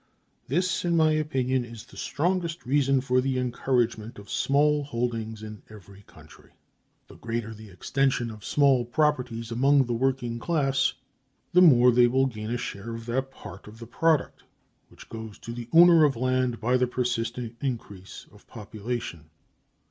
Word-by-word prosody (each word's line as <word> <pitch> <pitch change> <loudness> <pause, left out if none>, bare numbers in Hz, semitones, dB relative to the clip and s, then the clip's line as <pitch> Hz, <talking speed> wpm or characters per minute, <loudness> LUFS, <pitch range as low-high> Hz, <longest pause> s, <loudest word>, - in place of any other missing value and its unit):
This, 180 +7 0
in 170 -1 +1
my 155 -1 +4
opinion, 130 -5 0
is 115 -2 -11
the - - -18
strongest 170 0 -2
reason 135 0 +2
for 125 -1 +1
the 130 0 -1
encouragement 120 -3 -1
of 100 0 -12
small 145 +1 +2
holdings 115 -4 -4
in 110 -1 -9
every 100 -2 -14
country. 75 -1 -18 0.5
The - - -15
greater 115 -1 -4
the 110 -1 -13
extension 125 +5 -1
of 105 -2 -12
small 135 -2 +3
properties 125 -4 -1
among 135 +3 +3
the 120 - -2
working 120 -1 -1
class, 135 -3 0 0.6
the 180 - +6
more 125 -8 +7
will 125 +2 +4
they 130 - -7
gain 110 0 -6
a 120 - -1
share 115 0 -6
of 115 0 -9
that 130 +3 -2
part 105 -7 -12
of 105 +1 -12
the 115 - -10
product 155 +5 0 0.5
which - - -16
goes 110 -2 -9
to 115 - -8
the 120 0 -8
owner 170 -1 +7
of 145 -3 +3
land 130 0 0
by 125 +3 +1
the 125 0 +1
persistent 120 -1 -3
increase 105 -8 -6
of 105 - -20
population. 105 - -6
125 Hz, 165 wpm, -26 LUFS, 115-135 Hz, 0.6 s, more